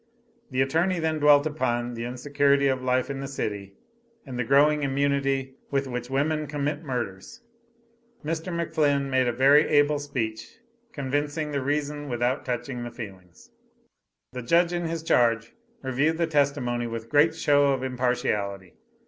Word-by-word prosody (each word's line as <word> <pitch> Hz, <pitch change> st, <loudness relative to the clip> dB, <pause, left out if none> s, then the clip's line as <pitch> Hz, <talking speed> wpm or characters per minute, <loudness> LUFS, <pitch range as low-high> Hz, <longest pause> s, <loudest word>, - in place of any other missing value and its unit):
The 130 Hz, -1 st, +2 dB
attorney 165 Hz, +7 st, +1 dB
then 160 Hz, -1 st, -1 dB
dwelt 145 Hz, 0 st, +6 dB
upon 120 Hz, -5 st, -1 dB
the 115 Hz, 0 st, -5 dB
insecurity 140 Hz, +3 st, +1 dB
of 130 Hz, -1 st, 0 dB
life 130 Hz, +1 st, 0 dB
in 135 Hz, -, -5 dB
the 135 Hz, -, -4 dB
city, 100 Hz, -7 st, -5 dB, 0.5 s
and 130 Hz, -3 st, -6 dB
the -, -, +1 dB
growing 145 Hz, +4 st, +4 dB
immunity 135 Hz, -1 st, 0 dB, 0.2 s
with 140 Hz, -1 st, 0 dB
which 125 Hz, -1 st, -5 dB
women 150 Hz, +3 st, 0 dB
committed 145 Hz, +1 st, -3 dB
murders. 120 Hz, -, -5 dB, 0.8 s
Mr. 165 Hz, +3 st, -3 dB
McFlinn 150 Hz, -5 st, 0 dB
made 130 Hz, -1 st, +2 dB
a -, -, +2 dB
very 140 Hz, +5 st, +5 dB
able 145 Hz, 0 st, +3 dB
speech; 125 Hz, -, -4 dB, 0.3 s
convincing 145 Hz, -, -2 dB
the 140 Hz, -1 st, -1 dB
reason 145 Hz, +1 st, -2 dB
without 120 Hz, +1 st, -1 dB
touching 125 Hz, 0 st, -3 dB
the 120 Hz, -, -5 dB
feelings. 95 Hz, -7 st, -11 dB, 0.8 s
The 125 Hz, -, -6 dB
Judge 170 Hz, +8 st, +2 dB
in 175 Hz, -1 st, -2 dB
his 165 Hz, 0 st, -3 dB
charge 115 Hz, -6 st, +2 dB, 0.3 s
reviewed 140 Hz, +5 st, +1 dB
the 170 Hz, -, +2 dB
testimony 140 Hz, -6 st, 0 dB
with 115 Hz, 0 st, -6 dB
great 150 Hz, +2 st, +4 dB
show 145 Hz, -3 st, +3 dB
of 135 Hz, -2 st, 0 dB
impartiality. 125 Hz, -7 st, -2 dB
140 Hz, 150 wpm, -26 LUFS, 125-150 Hz, 0.8 s, dwelt